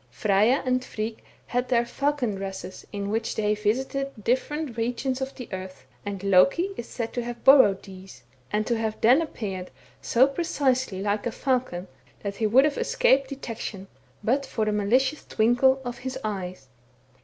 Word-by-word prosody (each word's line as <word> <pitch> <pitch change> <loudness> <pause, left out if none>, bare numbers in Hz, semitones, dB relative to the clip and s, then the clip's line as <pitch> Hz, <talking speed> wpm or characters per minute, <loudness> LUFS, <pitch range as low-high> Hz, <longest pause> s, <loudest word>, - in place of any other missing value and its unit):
Frejja 210 - +2
and 255 0 +1
Frigg 220 -2 -5 0.2
had 245 +1 -1
their 240 -2 +3
falcon 275 -2 -1
dresses 190 -1 -7
in 200 -1 -3
which 225 +1 -1
they 210 -1 +1
visited 265 +6 -1
different 260 +3 -1
regions 250 +3 -2
of 265 +1 -4
the 250 - -8
earth, 185 0 -7 0.2
and 200 -2 -5
Loki 200 - +4
is 235 - -7
said 230 -2 -4
to 245 - -2
have 240 0 -7
borrowed 260 -8 +6
these, 190 -9 -12 0.3
and 215 0 0
to 235 - +1
have 220 -1 -2
then 250 +8 +6
appeared 195 - -5 0.3
so 245 +3 +4
precisely 265 - 0
like 205 +2 0
a - - -2
falcon, 245 -9 -1 0.4
that 200 -1 -4
he 220 - +1
would 260 +6 +6
have 300 -1 0
escaped 390 - +3
detection, 230 -7 -6 0.4
but 260 +6 +2
for 220 -5 -2
the 215 - +1
malicious 255 +8 +1
twinkle 245 +4 +3
of 245 0 -5
his 260 0 -4
eyes. 185 -8 -4
235 Hz, 165 wpm, -26 LUFS, 205-265 Hz, 0.4 s, borrowed